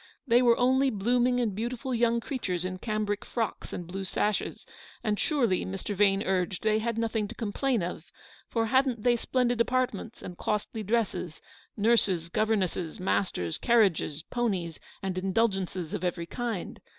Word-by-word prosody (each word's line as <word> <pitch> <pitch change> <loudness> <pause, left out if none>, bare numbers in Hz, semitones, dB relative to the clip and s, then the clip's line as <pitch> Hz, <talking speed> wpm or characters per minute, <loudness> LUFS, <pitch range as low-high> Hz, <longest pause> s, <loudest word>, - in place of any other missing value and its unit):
They 240 -2 +5
were 235 -2 +5
only 260 +2 +4
blooming 245 +3 +2
and 230 -5 0
beautiful 240 +5 -3
young 235 0 +2
creatures 185 - -2
in 185 0 -4
cambric 210 -1 -1
frocks 230 -3 -3
and 175 - -5
blue 190 +3 -5
sashes; 205 +2 -1 0.4
and 210 -1 0
surely, 240 - +2
Mr. 195 +2 -4
Vane 200 0 +3
urged, 185 -1 -1
they 215 0 +3
had 230 0 -2
nothing 225 -2 0
to 235 - -9
complain 230 0 0
of, 170 -1 -6 0.4
for 230 -1 +1
hadn't 260 -2 +2
they 245 -1 +4
splendid 245 0 +1
apartments 240 -3 -1
and 180 - -8
costly 210 +1 -2
dresses, 210 -6 -1 0.4
nurses, 200 -6 +2
governesses, 190 -5 0
masters, 180 - 0
carriages, 190 -10 +2
ponies, 190 -9 -1 0.2
and 185 -1 -1
indulgences 190 -3 0
of - - -3
every 175 -1 -1
kind? 230 -1 -4
215 Hz, 150 wpm, -29 LUFS, 185-235 Hz, 0.4 s, They